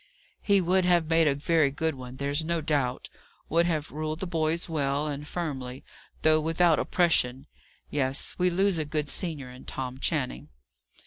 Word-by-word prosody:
"He 200 Hz, -2 st, +3 dB
would 185 Hz, +2 st, +3 dB
have 170 Hz, -3 st, +2 dB
made 165 Hz, -1 st, +4 dB
a 140 Hz, -, +2 dB
very 155 Hz, 0 st, +2 dB
good 160 Hz, +3 st, -1 dB
one, 130 Hz, -1 st, -9 dB
there's 140 Hz, +3 st, -1 dB
no 170 Hz, +1 st, 0 dB
doubt. 145 Hz, -5 st, -1 dB, 0.4 s
Would 170 Hz, +2 st, +3 dB
have 155 Hz, -3 st, -2 dB
ruled 155 Hz, +1 st, -4 dB
the -, -, -3 dB
boys 165 Hz, -1 st, 0 dB
well 145 Hz, -2 st, 0 dB
and 145 Hz, 0 st, -5 dB
firmly, 135 Hz, -7 st, -5 dB, 0.4 s
though 155 Hz, 0 st, +5 dB
without 165 Hz, +1 st, +3 dB
oppression. 135 Hz, -7 st, +2 dB, 0.5 s
Yes, 135 Hz, -1 st, -1 dB
we 180 Hz, 0 st, +4 dB
lose 190 Hz, 0 st, +2 dB
a 155 Hz, -, -1 dB
good 150 Hz, -1 st, -2 dB
senior 150 Hz, -8 st, -2 dB
in 125 Hz, -, -12 dB
Tom 130 Hz, 0 st, -5 dB
Channing." 65 Hz, -, -2 dB
155 Hz, 170 wpm, -27 LUFS, 140-170 Hz, 0.5 s, though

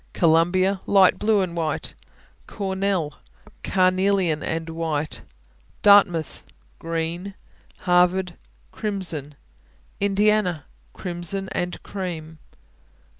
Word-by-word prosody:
Columbia 175 Hz, +4 st, +3 dB
Light 195 Hz, -2 st, +5 dB
blue 215 Hz, -1 st, +3 dB
and 175 Hz, -2 st, -3 dB
white. 160 Hz, -2 st, -2 dB, 0.5 s
Cornell 190 Hz, -5 st, -2 dB, 0.5 s
Carnelian 185 Hz, -3 st, +2 dB
and 165 Hz, +2 st, -3 dB
white. 160 Hz, -2 st, -3 dB, 0.6 s
Dartmouth 195 Hz, -7 st, +5 dB, 0.4 s
Green. 165 Hz, +4 st, -3 dB, 0.5 s
Harvard 180 Hz, 0 st, +2 dB, 0.4 s
Crimson. 185 Hz, -7 st, -4 dB, 0.6 s
Indiana 200 Hz, -4 st, +1 dB, 0.3 s
Crimson 180 Hz, +2 st, -4 dB
and 175 Hz, -2 st, -3 dB
cream. 165 Hz, -5 st, -6 dB
180 Hz, 75 wpm, -23 LUFS, 165-195 Hz, 0.6 s, Light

